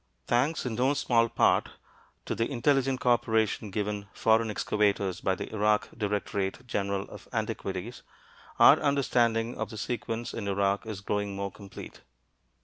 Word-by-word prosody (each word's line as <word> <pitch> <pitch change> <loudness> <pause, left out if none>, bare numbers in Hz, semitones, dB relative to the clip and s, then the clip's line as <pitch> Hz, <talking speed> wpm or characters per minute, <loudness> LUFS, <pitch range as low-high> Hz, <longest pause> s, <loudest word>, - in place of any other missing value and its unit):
Thanks 130 +7 +1
in 125 - -2
no 130 +5 +2
small 115 -3 +2
part 115 - +3 0.6
to - - -2
the 115 - -1
intelligent 135 0 +1
co 125 0 +2
operation 110 -2 +1
given 105 0 -3
foreign 110 0 +3
excavators 100 -3 0
by 95 - +1
the - - -7
Iraq 105 0 +2
Directorate 105 0 -2
General 100 -4 -1
of - - -12
Antiquities, 95 +5 -4 0.6
our - - +8
understanding 120 -5 +1
of - - -2
the 110 - -8
sequence 115 +1 -3
in 105 -3 -4
Iraq 100 +1 0
is 105 -3 -5
growing 100 0 -2
more 100 0 -3
complete. 100 +1 -11
110 Hz, 145 wpm, -28 LUFS, 100-120 Hz, 0.6 s, our